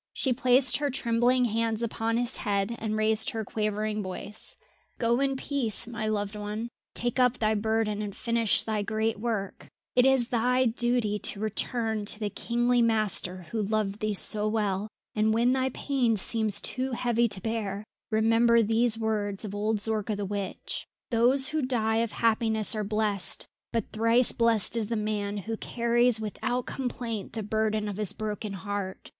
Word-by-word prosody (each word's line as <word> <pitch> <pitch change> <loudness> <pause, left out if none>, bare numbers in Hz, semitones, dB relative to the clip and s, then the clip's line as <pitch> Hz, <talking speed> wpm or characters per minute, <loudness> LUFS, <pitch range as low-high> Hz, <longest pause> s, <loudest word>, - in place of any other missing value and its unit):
She 260 - 0
placed 255 +1 +3
her 290 0 -1
trembling 245 0 +2
hands 225 0 -1
upon 230 0 -1
his 245 +1 -1
head 205 +1 -1
and 215 -1 -2
raised 220 +2 +1
her 225 -5 -4
quavering 215 0 -2
voice: 195 +2 -7 0.4
"Go 235 +1 +1
in 275 -1 +1
peace, 260 -6 +1
my 220 -2 -4
loved 205 -1 -2
one, 210 +3 -4 0.3
take 240 +1 -1
up 250 0 +3
thy 215 -1 +1
burden 220 0 0
and 205 -2 -5
finish 230 -3 +1
thy 215 -2 -1
great 220 0 -1
work; 215 -4 -3 0.3
it 250 - +6
is 260 -2 +3
thy 250 +2 +2
duty 235 -3 +1
to 200 - -2
return 220 +1 0
to 210 - 0
the 210 -2 -2
kingly 240 +3 +1
master 215 -5 +1
who 225 - -1
loved 210 -1 -1
thee 215 -2 -1
so 210 +2 +2
well, 210 -2 -1 0.3
and 220 +1 +2
when 240 +2 +3
thy 260 0 +1
pain 255 -3 0
seems 215 0 +2
too 260 0 -3
heavy 235 -1 +1
to 200 - -5
bear, 210 -1 -3 0.3
remember 230 +1 +4
these 225 +1 +2
words 215 -2 -2
of 200 - -6
old 210 +2 0
Zorka 215 0 -1
the 205 - -3
witch. 200 0 -4 0.2
"Those 250 +4 +3
who 310 0 -1
die 225 -4 0
of 230 -1 0
happiness 220 -1 +1
are 215 -1 -1
blessed, 210 -2 0 0.3
but 230 - -2
thrice 230 +3 +5
blessed 230 -2 +2
is 225 -3 0
the 230 - -2
man 210 -1 -2
who 220 +3 -4
carries 235 0 +2
without 235 +3 -3
complaint 235 -5 -4
the 220 - -4
burden 215 0 0
of 200 -2 -5
his 210 -2 +1
broken 215 -1 -4
heart. 195 0 -5
220 Hz, 170 wpm, -28 LUFS, 210-235 Hz, 0.4 s, it